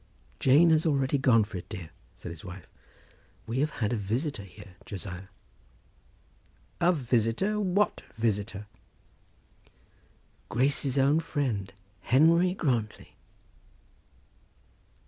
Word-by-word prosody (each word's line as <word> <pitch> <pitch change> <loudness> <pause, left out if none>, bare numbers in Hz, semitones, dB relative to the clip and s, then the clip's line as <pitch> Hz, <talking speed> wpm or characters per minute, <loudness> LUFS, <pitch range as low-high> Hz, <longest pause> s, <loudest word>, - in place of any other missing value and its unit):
"Jane 150 +6 +5
has 160 +1 +3
already 140 -2 +1
gone 120 -4 +5
for 100 - -7
it, 90 +1 -9
dear," 85 -3 -7 0.2
said - - -8
his 85 -2 -10
wife. 95 -2 -9 0.8
"We 115 +3 -2
have 150 +2 +2
had 115 -5 -2
a - - +1
visitor 115 +6 -2
here, 95 -1 -13
Josiah." 95 -4 -7 1.5
"A 175 +1 +4
visitor, 130 - 0
what 200 +1 +1 0.2
visitor?" 105 -2 -1 1.8
"Grace's 135 +2 +1
own 140 +4 +4
friend, 125 -12 -2 0.3
Henry 165 - +4
Grantly." 120 - -2
125 Hz, 105 wpm, -28 LUFS, 100-150 Hz, 1.8 s, Jane